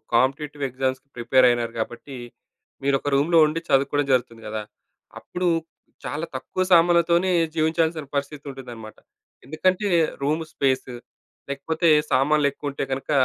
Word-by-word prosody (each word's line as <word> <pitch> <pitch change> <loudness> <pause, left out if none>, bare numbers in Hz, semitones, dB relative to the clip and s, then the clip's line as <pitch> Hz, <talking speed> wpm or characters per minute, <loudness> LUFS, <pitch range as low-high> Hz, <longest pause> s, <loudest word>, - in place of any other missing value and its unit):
Competitive 140 +3 0
ఎగ్జామ్స్‌కీ 130 +1 -3
prepare 130 +2 +4
అయినారు 120 -1 -1
కాబట్టి 120 +4 -5 0.7
మీరు 140 0 +2
ఒక 145 - -3
రూమ్‌లో 155 +5 +3
ఉండి 155 +2 -1
చదువుకోవడం 140 +1 +2
జరుగుతుంది 120 -2 -1
కదా! 110 0 -4 0.6
అప్పుడు 180 0 -3 0.6
చాలా 155 +3 -3
తక్కువ 130 +7 -4
సామానులతోనే 170 +1 +4 0.3
జీవించాల్సిన 160 0 0
పరిస్థితి 140 +1 -3
ఉంటుందన్నమాట. 120 -5 -10 0.5
ఎందుకంటే, 185 +7 0 0.4
రూమ్ 155 +3 0
స్పేస్ 130 -1 0 0.6
లేకపోతే 160 +5 -1 0.2
సామాన్లు 140 +3 +3
ఎక్కువ 145 +1 -5
ఉంటే 140 - -3
గనక, 135 +2 -4
140 Hz, 120 wpm, -23 LUFS, 130-160 Hz, 0.7 s, prepare